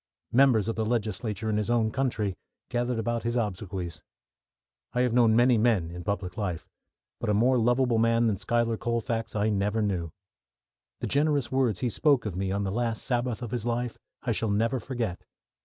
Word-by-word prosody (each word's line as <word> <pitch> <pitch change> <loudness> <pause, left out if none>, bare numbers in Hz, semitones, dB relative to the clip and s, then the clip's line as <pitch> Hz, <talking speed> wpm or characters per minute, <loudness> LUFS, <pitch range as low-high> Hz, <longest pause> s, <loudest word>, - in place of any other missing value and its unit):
Members 120 -5 +4
of 115 - -1
the 110 - 0
legislature 110 -1 -2
in 105 -1 +1
his 105 +1 -1
own 115 -2 +2
country 115 -7 -1 0.4
gathered 120 -1 -1
about 115 +1 -1
his 120 0 -2
obsequies. 95 -6 -3 0.9
I 125 - +1
have 125 -2 +2
known 115 -2 +5
many 120 0 +5
men 105 -8 +2
in 90 0 -7
public 95 -3 -3
life, 90 -7 -3 0.5
but - - -2
a 105 - +3
more 125 +4 +4
lovable 120 0 +2
man 115 +1 +3
than 110 -3 +2
Schuyler 115 +3 0
Colfax 115 -1 -2
I 105 +1 +2
never 105 +1 0
knew. 90 -5 -1 0.9
The - - -1
generous 145 -2 +1
words 130 -7 +1
he 125 - 0
spoke 140 - +2
of 100 -5 -3
me 95 0 -1
on 100 +1 -1
the 95 - -1
last 115 0 -1
Sabbath 125 -2 -1
of 115 - -5
his 120 -3 -2
life 120 0 -2 0.2
I 125 - 0
shall 110 +1 0
never 115 +5 +1
forget. 115 -6 -4
115 Hz, 190 wpm, -27 LUFS, 105-120 Hz, 0.9 s, known